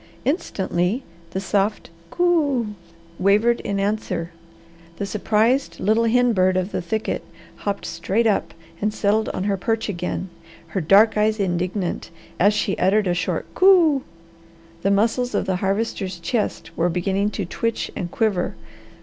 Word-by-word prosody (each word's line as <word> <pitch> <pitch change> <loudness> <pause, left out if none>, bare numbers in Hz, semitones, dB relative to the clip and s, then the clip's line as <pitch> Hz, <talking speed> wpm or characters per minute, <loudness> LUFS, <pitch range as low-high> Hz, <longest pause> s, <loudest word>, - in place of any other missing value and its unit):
Instantly 205 - -1 0.3
the 190 - -3
soft 200 0 -1 0.2
"Coo!" 290 - +1 0.5
wavered 210 +5 +3
in 200 -1 -2
answer. 195 -4 -2 0.7
The 200 - -2
surprised 220 +6 +1
little 220 +3 +2
hen 245 +1 +3
bird 185 -1 +3
of 185 +2 -1
the - - -2
thicket 220 +5 -2 0.3
hopped 200 -1 -3
straight 190 +7 -1
up 215 -3 +1 0.3
and 210 +1 +1
settled 215 +1 +1
on 185 - -3
her 200 -1 0
perch 225 +3 -1
again, 180 0 -3 0.4
her 190 - -2
dark 205 +6 +5
eyes 215 +1 +2
indignant 180 0 -2 0.3
as 205 +3 +4
she 200 - 0
uttered 200 +3 +3
a 180 - +1
short 180 +1 -1
"Coo!" 345 -7 +5 0.8
The 195 - +1
muscles 225 +5 +1
of - - +1
the 190 -2 0
Harvester's 195 -1 -2
chest 210 +6 -2
were 170 +1 +1
beginning 195 +4 0
to 200 - -1
twitch 230 +6 -2
and 175 - -3
quiver. 205 -3 0
205 Hz, 145 wpm, -22 LUFS, 185-225 Hz, 0.8 s, dark